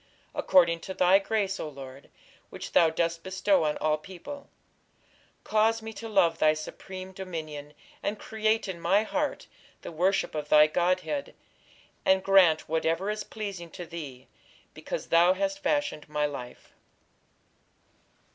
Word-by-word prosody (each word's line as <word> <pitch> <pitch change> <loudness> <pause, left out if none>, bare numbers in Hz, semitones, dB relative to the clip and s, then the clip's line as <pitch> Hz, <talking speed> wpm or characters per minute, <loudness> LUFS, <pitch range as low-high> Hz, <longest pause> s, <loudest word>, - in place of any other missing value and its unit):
According 170 -3 +4
to 190 +3 -7
thy 185 +2 +5
grace, 200 -1 -1
O 155 - -4
Lord, 135 -1 -11 0.4
Which - - -8
thou 165 - +5
dost 165 +1 -1
bestow 190 -1 +1
on 150 - 0
All 155 0 +1
people, 195 - -10 0.9
Cause 220 +1 +2
me 220 0 -6
to 225 +1 -7
love 175 -6 +3
thy 155 0 +4
supreme 185 +4 -8
dominion, 155 -6 -7 0.3
And 210 - -2
create 220 0 0
in 175 -3 -6
my 195 +5 +3
heart 295 +6 -2 0.4
The - - -7
worship 185 +4 +1
of 150 -1 -4
thy 150 0 +8
godhead 185 - -1 0.7
And 190 0 +3
grant 185 -5 +5
whatever 165 +5 0
is 210 0 -4
pleasing 200 -6 -6
to 175 - -7
thee, 145 -7 -8 0.5
Because - - -6
thou 170 +2 +5
hast 290 +6 -2
fashioned 290 - -1
my 150 0 0
life. 130 -4 -7
180 Hz, 140 wpm, -28 LUFS, 155-205 Hz, 0.9 s, thy